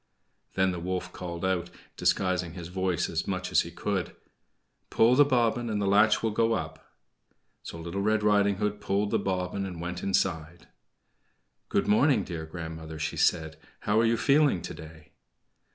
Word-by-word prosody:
Then 95 0 +2
the 90 - -4
wolf 90 +1 -4
called 85 0 -5
out, 90 -2 -1 0.3
disguising 90 -3 0
his 85 -2 -7
voice 95 -2 -1
as - - -3
much - - -3
as - - +5
he - - -6
could: - - -3 0.7
"Pull 115 +2 +4
the 145 +3 +7
bobbin 120 -3 +1
and 105 -1 -1
the 100 - 0
latch 105 +4 +4
will 110 - +1
go 115 +2 +2
up." 80 -4 -6 0.7
So 85 - -8
Little 85 +4 -4
Red 110 +1 +1
Riding 100 -1 +3
Hood 105 +1 -2
pulled 100 +1 0
the - - +2
bobbin 95 0 -2
and 90 -3 -6
went 90 +1 -5
inside. 85 -4 -1 1.0
"Good - - +1
morning, 115 +1 +4
dear 80 -3 -6
grandmother," 80 -1 -7
she 75 0 -3
said. 80 -3 +1 0.2
"How 105 +1 +2
are 115 - +4
you 115 0 +2
feeling 140 - +3
today?" 80 0 -10
95 Hz, 170 wpm, -28 LUFS, 85-105 Hz, 1.0 s, the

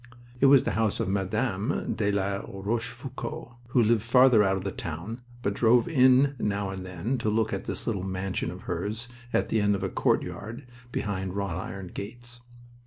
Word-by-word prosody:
It 135 - +6
was 135 -1 +7
the - - 0
house 110 -2 +1
of - - 0
Mme. 100 +5 -1
de 105 -2 0
la 100 0 0
Rochefoucauld, 115 +5 -4 0.2
who 120 0 +3
lived 110 0 +3
farther 125 0 +6
out 95 -1 +2
of 95 - -5
the 100 - -2
town, 85 +11 -6 0.2
but 100 - +1
drove 120 +3 +4
in 135 -2 +5
now 100 -2 -1
and 95 -1 -6
then 95 +8 -3
to 110 - 0
look 110 0 +1
at - - -3
this - - -3
little 105 -5 -1
mansion 95 0 -2
of - - -8
hers 110 +4 -3 0.2
at - - +1
the 110 - +2
end 105 0 +3
of 95 - -4
a - - 0
courtyard 115 +6 -1 0.3
behind 95 -4 -3
wrought 100 -5 -2
iron 95 -2 -7
gates. 120 +3 -8
105 Hz, 185 wpm, -27 LUFS, 95-120 Hz, 0.3 s, was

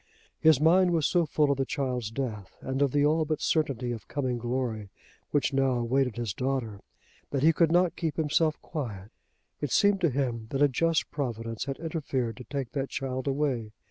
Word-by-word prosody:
His 155 -4 +5
mind 175 +3 +5
was 160 -3 +2
so 175 -3 +2
full 150 -1 +2
of 140 - -1
the - - +3
child's 125 -5 -2
death 110 -5 -5
and 130 +1 -3
of 140 -2 +3
the 145 +1 +3
all 155 +2 +3
but 155 -1 -2
certainty 135 -6 0
of 115 -4 -6
coming 130 -4 -2
glory 120 -4 -2 0.4
which 145 -1 +1
now 135 -1 +2
awaited 125 +1 +1
his 120 -5 -3
daughter, 125 -3 -2 0.5
that 140 -1 -1
he 165 +1 +6
could 165 0 +3
not 175 0 +3
keep 160 -3 -2
himself 155 0 +1
quiet. 105 -9 -5 0.5
It 145 - -1
seemed 200 -1 +4
to 170 - +4
him 120 -4 -2
that 140 +1 +1
a - - +7
just 165 +5 0
Providence 115 -5 -3
had 135 -1 -4
interfered 140 -8 -2
to 125 - -8
take 135 -4 -4
that 135 -1 -2
child 130 -1 -3
away. 135 -6 -1
135 Hz, 195 wpm, -28 LUFS, 120-155 Hz, 0.5 s, a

